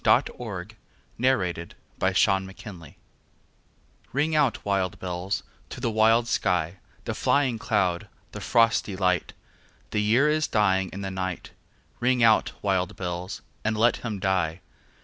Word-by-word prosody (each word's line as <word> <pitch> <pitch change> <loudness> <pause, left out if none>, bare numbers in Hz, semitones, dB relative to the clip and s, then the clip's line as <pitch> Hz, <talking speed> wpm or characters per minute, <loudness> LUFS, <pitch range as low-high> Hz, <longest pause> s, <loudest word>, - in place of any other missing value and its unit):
Alfred, - - +4
Lord - - -6 0.5
Tennyson 90 -10 +1 0.3
Ring - - +3
Out, - - -6
Wild 95 0 0
Bells 85 - -10 1.2
RING 150 +4 +1
out, 145 -7 +2
wild 95 -3 0
bells, 90 +1 -3 0.3
to - - -7
the 115 - -1
wild 115 +2 +4
sky, 90 -4 0 0.3
The - - -2
flying 130 -5 +1
cloud, 105 -5 0 0.2
the - - -7
frosty 115 -3 +2
light; 90 -3 0 0.6
The 105 - +1
year 115 +8 +4
is 155 +1 +2
dying 95 -3 +2
in 100 - -6
the 95 -1 -4
night; 95 -1 -4 0.5
Ring 125 0 +2
out, 110 -1 +4
wild 95 -1 0
bells, 90 +1 -5 0.2
and 110 0 0
let 115 +3 +4
him 110 -4 -4
die. 95 -3 0
100 Hz, 145 wpm, -26 LUFS, 95-115 Hz, 1.2 s, Alfred